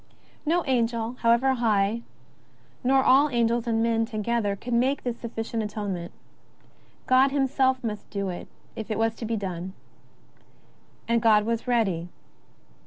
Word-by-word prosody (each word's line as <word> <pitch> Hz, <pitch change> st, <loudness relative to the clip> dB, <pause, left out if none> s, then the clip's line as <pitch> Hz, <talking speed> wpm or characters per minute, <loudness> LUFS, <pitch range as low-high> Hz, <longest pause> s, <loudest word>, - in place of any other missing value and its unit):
No 345 Hz, +2 st, +2 dB
Angel, 235 Hz, -3 st, 0 dB
however 235 Hz, +3 st, +3 dB
high, 220 Hz, -2 st, +1 dB, 0.8 s
nor 265 Hz, +1 st, +4 dB
all 275 Hz, +4 st, +5 dB
Angels 235 Hz, -1 st, +1 dB
and 225 Hz, -1 st, +1 dB
men 230 Hz, -1 st, +2 dB
to 225 Hz, -2 st, -6 dB
gether, 215 Hz, -2 st, 0 dB
could 245 Hz, +5 st, -6 dB
make 260 Hz, +4 st, +1 dB
this 245 Hz, -1 st, -3 dB
sufficient 225 Hz, -1 st, -4 dB
atonement. 205 Hz, -5 st, -4 dB, 0.9 s
God 260 Hz, +2 st, +5 dB
him 275 Hz, 0 st, +1 dB
self 260 Hz, -1 st, +1 dB
must 210 Hz, -3 st, -5 dB
do 200 Hz, -2 st, -3 dB
it 175 Hz, -, -6 dB, 0.3 s
if 220 Hz, -, -6 dB
it 215 Hz, -, -1 dB
was 225 Hz, 0 st, +1 dB
to 230 Hz, -, -5 dB
be 225 Hz, 0 st, -1 dB
done. 185 Hz, -2 st, -5 dB, 1.3 s
And 235 Hz, 0 st, +2 dB
God 215 Hz, -2 st, +4 dB
was 230 Hz, +2 st, -2 dB
ready. 195 Hz, -8 st, 0 dB
230 Hz, 150 wpm, -26 LUFS, 210-250 Hz, 1.3 s, all